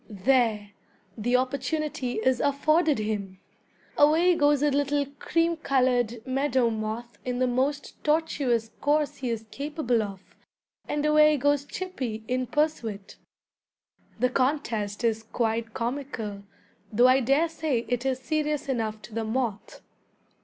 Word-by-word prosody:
There! 215 -1 +1 0.4
the 240 +3 0
opportunity 260 +1 -1
is 250 +3 +1
afforded 305 +2 +2
him. 205 -3 -3 0.6
Away 320 +5 +5
goes 295 -3 +3
a 295 - +3
little 285 +1 +1
cream 335 0 +1
colored 250 -5 +1
meadow 260 -2 +1
moth 220 +2 -5
in 250 -1 -2
the 255 - +2
most 265 +3 -2
tortuous 285 -7 +1
course 295 0 +1
he 255 -2 -3
is 225 -1 -3
capable 280 -4 -1
of, 195 -3 -8 0.5
and 295 0 -1
away 305 0 +5
goes 285 +1 +1
Chippy 260 -13 -5
in 255 0 -1
pursuit. 230 -10 -2 1.0
The 250 +2 +2
contest 240 -7 -1
is 225 -1 +1
quite 225 0 -2
comical, 230 -5 -4 0.5
though 240 +4 +5
I 255 +1 +5
dare 275 +6 +2
say 310 -7 -2
it 245 0 -1
is 265 -1 0
serious 300 +3 -2
enough 220 -5 -2
to 220 - -11
the 225 +1 -2
moth. 220 -2 -3
255 Hz, 130 wpm, -27 LUFS, 225-290 Hz, 1.0 s, Away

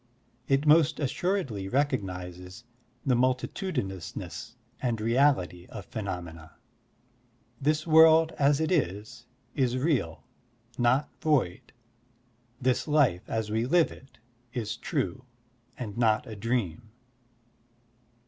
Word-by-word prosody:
It 135 +2 +2
most 155 +1 +5
assuredly 140 - -1
recognizes 95 -7 -3 0.4
the 130 - +3
multitudinousness 125 - -2 0.3
and 120 -4 -1
reality 115 -7 +1
of 100 - -9
phenomena. 85 -7 -6 1.1
This 155 +2 +1
world 160 0 +6
as 140 0 +4
it 160 +2 0
is, 105 - -2 0.3
is 130 -2 +1
real, 130 - -1 0.5
not 125 +4 +2
void. 140 - 0 0.9
This 130 +2 0
life 140 - +2
as 110 -1 -2
we 110 +2 0
live 170 +3 +3
it, 135 - -15 0.4
is 110 -3 -3
true, 130 +1 -3 0.5
and 105 -5 -6
not 110 -2 +3
a 110 - -8
dream. 110 -2 -2
125 Hz, 100 wpm, -28 LUFS, 100-145 Hz, 1.1 s, world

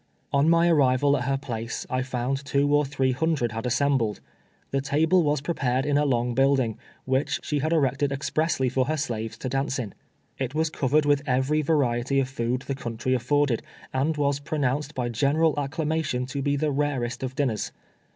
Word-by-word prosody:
On 140 +3 +4
my 170 +1 +4
arrival 140 -3 +4
at 125 -3 -2
her 135 +1 +1
place, 115 -4 -5
I 130 0 -1
found 130 +1 -2
two 140 0 +1
or 145 0 +4
three 135 -1 0
hundred 140 -3 0
had 115 +2 -3
assembled. 130 -3 +1 0.5
The 135 - 0
table 155 +6 +3
was 150 -3 +1
prepared 135 -4 0
in 145 -1 +1
a 145 +1 +3
long 120 -3 +1
building, 135 -3 +2 0.3
which 130 +2 0
she 150 - -1
had 155 +4 -1
erected 140 -2 +1
expressly 140 0 0
for 130 +1 +1
her 155 +3 -1
slaves 115 -6 -3
to - - -5
dance 135 0 -1
in. 115 -6 -4 0.5
It 135 +1 -3
was 160 0 +1
covered 145 +1 +1
with 145 -1 +3
every 135 +4 +2
variety 135 -3 +1
of 135 - +1
food 125 0 -2
the 135 - -3
country 120 -1 -3
afforded, 130 0 +1 0.3
and 145 +4 0
was 140 -1 +1
pro 155 +2 -4
nounced 145 +2 -1
by 125 -3 -1
general 145 +7 +2
acclamation 150 -3 -1
to 140 +1 -3
be 145 +1 +1
the 150 +1 0
rarest 135 -4 -1
of 130 -1 -4
dinners. 125 -6 -1
135 Hz, 190 wpm, -25 LUFS, 125-145 Hz, 0.5 s, On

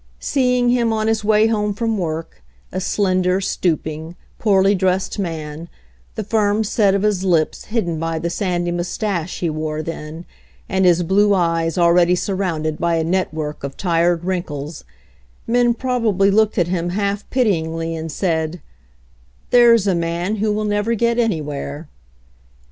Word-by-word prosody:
Seeing 250 - +1
him 240 -2 +2
on 215 -1 0
his 220 -1 0
way 215 0 +4
home 210 -2 0
from 225 0 -1
work, 165 -2 -4 0.3
a 185 - -3
slender, 185 -1 +1
stooping, 160 -3 -2 0.2
poorly 195 -2 +3
dressed 190 +1 0
man, 160 -2 -5 0.5
the 215 - -3
firm 210 0 +1
set 205 -2 +2
of 200 - 0
his 205 -3 +1
lips 170 -5 +1
hidden 180 -8 -2
by 165 0 -2
the 170 +1 -2
sandy 175 -2 -1
mustache 175 0 -3
he 175 - +1
wore 155 0 -3
then, 160 +1 -7 0.4
and 190 -1 +1
his 175 0 +4
blue 200 +3 +3
eyes 165 -2 0
already 175 0 +4
surrounded 175 -5 -2
by 170 -1 +1
a 165 - +1
network 160 -4 -2
of 140 -1 -6
tired 170 -1 +1
wrinkles, 155 -5 -4 0.6
men 240 0 +2
probably 225 -7 +1
looked 215 +1 +2
at 175 -3 +2
him 175 -1 -1
half 200 +2 -2
pity 215 -10 +2
ingly, 165 +1 -4
and 160 0 -5
said: 160 0 -1 0.9
"There's 235 -4 +6
a 195 - +2
man 170 +4 -1
who 215 +1 0
will 215 +1 -1
never 205 +2 0
get 235 +2 +1
anywhere." 150 -7 -2
185 Hz, 155 wpm, -20 LUFS, 165-210 Hz, 0.9 s, There's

